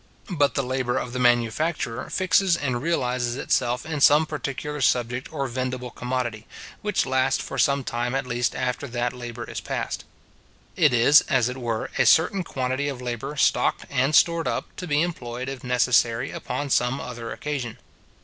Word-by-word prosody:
But 145 Hz, -5 st, +2 dB
the 140 Hz, -, +1 dB
labour 130 Hz, -1 st, -1 dB
of 125 Hz, -, -3 dB
the 125 Hz, -, -3 dB
manufacturer 120 Hz, +2 st, +1 dB
fixes 185 Hz, -1 st, +2 dB
and 125 Hz, -5 st, -2 dB
realizes 125 Hz, -6 st, 0 dB
itself 125 Hz, -1 st, 0 dB
in 155 Hz, -3 st, -3 dB
some 150 Hz, +3 st, +6 dB
particular 150 Hz, -1 st, -4 dB
subject 120 Hz, 0 st, 0 dB
or 140 Hz, -, -2 dB
vendible 125 Hz, 0 st, -4 dB
commodity, 125 Hz, -3 st, -3 dB, 0.3 s
which 210 Hz, -2 st, 0 dB
lasts 130 Hz, 0 st, +1 dB
for -, -, -5 dB
some 140 Hz, -1 st, +3 dB
time 120 Hz, +1 st, -2 dB
at 135 Hz, 0 st, -1 dB
least 120 Hz, 0 st, -1 dB
after 130 Hz, +2 st, -2 dB
that 120 Hz, 0 st, -2 dB
labour 120 Hz, -1 st, -7 dB
is -, -, -5 dB
past. -, -, -4 dB, 0.7 s
It 155 Hz, -6 st, +4 dB
is, 125 Hz, +5 st, +6 dB
as 125 Hz, -3 st, +3 dB
it 125 Hz, -, -6 dB
were, 115 Hz, -3 st, -3 dB
a -, -, +4 dB
certain 185 Hz, +4 st, +4 dB
quantity 130 Hz, -1 st, -2 dB
of 140 Hz, -3 st, -4 dB
labour 125 Hz, +3 st, -4 dB
stocked -, -, +2 dB
and 135 Hz, +3 st, +2 dB
stored 170 Hz, 0 st, +4 dB
up, -, -, -3 dB
to 180 Hz, -, -5 dB
be 150 Hz, 0 st, +2 dB
employed, 125 Hz, -7 st, -4 dB
if 135 Hz, -1 st, -6 dB
necessary, 125 Hz, 0 st, +2 dB
upon 135 Hz, +3 st, -4 dB
some 125 Hz, +3 st, +2 dB
other 120 Hz, -2 st, -6 dB
occasion. 140 Hz, -7 st, -4 dB
130 Hz, 170 wpm, -24 LUFS, 120-145 Hz, 0.7 s, some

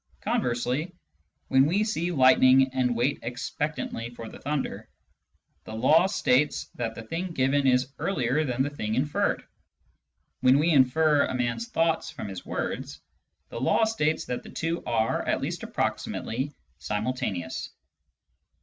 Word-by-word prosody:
Conversely, 125 Hz, +8 st, -1 dB, 0.5 s
when 135 Hz, +1 st, +5 dB
we 195 Hz, +7 st, +2 dB
see 180 Hz, -5 st, -1 dB
lightning 130 Hz, -2 st, +5 dB
and 125 Hz, -2 st, +1 dB
wait 125 Hz, +5 st, +1 dB
expectantly 125 Hz, 0 st, -4 dB
for 115 Hz, -1 st, -9 dB
the -, -, -11 dB
thunder, 145 Hz, 0 st, -3 dB, 0.8 s
the 110 Hz, -, -7 dB
law 155 Hz, +10 st, +4 dB
states 150 Hz, -7 st, +1 dB
that 115 Hz, -2 st, -4 dB
the 115 Hz, -, -7 dB
thing 165 Hz, +11 st, -3 dB
given 135 Hz, 0 st, +2 dB
is 130 Hz, +1 st, +2 dB
earlier 145 Hz, -4 st, 0 dB
than 130 Hz, -2 st, 0 dB
the 145 Hz, -, -1 dB
thing 110 Hz, -7 st, -3 dB
inferred. 145 Hz, +4 st, 0 dB, 1.0 s
When 130 Hz, +2 st, +5 dB
we 160 Hz, +4 st, +3 dB
infer 145 Hz, +2 st, +4 dB
a -, -, -3 dB
man's 125 Hz, -, -1 dB
thoughts 165 Hz, -7 st, 0 dB
from 135 Hz, -9 st, -7 dB
his 95 Hz, -2 st, -7 dB
words, -, -, -4 dB, 0.5 s
the 115 Hz, -, -6 dB
law 130 Hz, -, +3 dB
states 160 Hz, -9 st, 0 dB
that 125 Hz, -, -3 dB
the -, -, -12 dB
two 165 Hz, +1 st, -3 dB
are 115 Hz, -2 st, +1 dB
(at -, -, +1 dB
least -, -, -3 dB
approximately) 130 Hz, +6 st, -2 dB, 0.3 s
simxiltaneous. 105 Hz, -1 st, -3 dB
130 Hz, 140 wpm, -27 LUFS, 120-155 Hz, 1.0 s, when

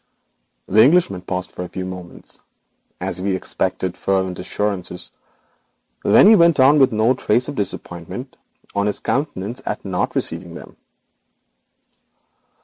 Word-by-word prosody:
The 105 Hz, +3 st, +4 dB
Englishman 140 Hz, -, +3 dB
paused 90 Hz, 0 st, -4 dB
for 90 Hz, -, -6 dB
a 90 Hz, -, -7 dB
few 95 Hz, -, -5 dB
moments 90 Hz, -1 st, -9 dB, 0.6 s
as 90 Hz, -, -4 dB
if 95 Hz, -, -4 dB
he 95 Hz, -, +1 dB
expected 95 Hz, -, -2 dB
fervent 95 Hz, -2 st, -1 dB
assurances; 90 Hz, -1 st, -4 dB, 0.9 s
then 215 Hz, 0 st, +7 dB
went 170 Hz, -3 st, +5 dB
on 140 Hz, +3 st, +6 dB
with 135 Hz, -1 st, +5 dB
no 110 Hz, +3 st, +3 dB
trace 120 Hz, -1 st, 0 dB
of 145 Hz, -, -4 dB
disappointment 95 Hz, -, -6 dB, 0.4 s
on 100 Hz, 0 st, 0 dB
his 105 Hz, -, -1 dB
countenance 130 Hz, -4 st, -3 dB
at -, -, -4 dB
not 90 Hz, -2 st, -2 dB
receiving 85 Hz, +1 st, -3 dB
them. -, -, -11 dB
100 Hz, 135 wpm, -20 LUFS, 90-130 Hz, 0.9 s, then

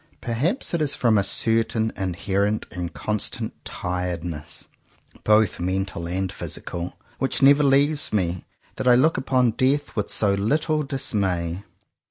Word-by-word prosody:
Perhaps 150 Hz, -, 0 dB
it 170 Hz, -, 0 dB
is 145 Hz, -2 st, +2 dB
from 115 Hz, -3 st, +2 dB
a 100 Hz, -, +3 dB
certain 110 Hz, +1 st, +1 dB
inherent 100 Hz, +3 st, -1 dB
and 90 Hz, -1 st, -4 dB
constant 105 Hz, -1 st, -3 dB
tired 90 Hz, -2 st, -3 dB
ness, 75 Hz, -3 st, -3 dB, 0.6 s
both 105 Hz, -1 st, +3 dB
mental 95 Hz, -1 st, -2 dB
and 95 Hz, +1 st, -2 dB
physical, 85 Hz, +1 st, -5 dB, 0.2 s
which 135 Hz, 0 st, 0 dB
never 140 Hz, +2 st, +7 dB
leaves 145 Hz, +2 st, +3 dB
me, 90 Hz, -4 st, -1 dB, 0.3 s
that -, -, -2 dB
I 125 Hz, -, +7 dB
look 155 Hz, +6 st, +3 dB
upon 130 Hz, -2 st, +2 dB
death 135 Hz, +5 st, 0 dB
with 105 Hz, -, -2 dB
so 100 Hz, -2 st, +2 dB
little 150 Hz, +10 st, +1 dB
dismay. 100 Hz, -, -1 dB
105 Hz, 140 wpm, -23 LUFS, 90-135 Hz, 0.6 s, never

